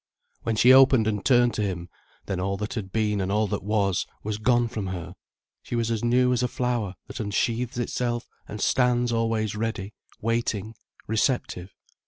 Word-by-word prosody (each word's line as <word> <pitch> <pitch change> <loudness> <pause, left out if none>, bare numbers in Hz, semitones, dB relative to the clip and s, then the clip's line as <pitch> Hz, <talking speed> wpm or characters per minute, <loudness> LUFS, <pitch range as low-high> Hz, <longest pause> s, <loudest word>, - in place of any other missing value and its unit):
When 115 - -1
she 120 +5 +7
opened 130 -3 +6
and 105 -2 -1
turned 120 -2 +4
to - - -2
him, 90 -4 -3 0.4
then 95 -2 -3
all 100 +1 -1
that 105 +1 -4
had 100 -5 -5
been 105 -2 0
and 95 +1 -2
all 105 +1 +2
that 100 - -3
was, 100 -3 0 0.2
was 105 0 -3
gone 120 +1 +3
from 110 -4 -4
her, 90 -3 -5 0.5
she - - -5
was 115 -1 0
as 115 -1 -1
new 125 +1 +3
as 125 - +1
a 125 - +2
flower 120 -6 -2
that - - -8
unsheathes 115 +3 -1
itself 120 0 -2 0.2
and 105 - -7
stands 125 +1 +2
always 115 -2 0
ready, 105 -2 -3 0.3
waiting, 115 -2 -1 0.3
receptive. 110 -5 -1
110 Hz, 180 wpm, -25 LUFS, 105-120 Hz, 0.5 s, she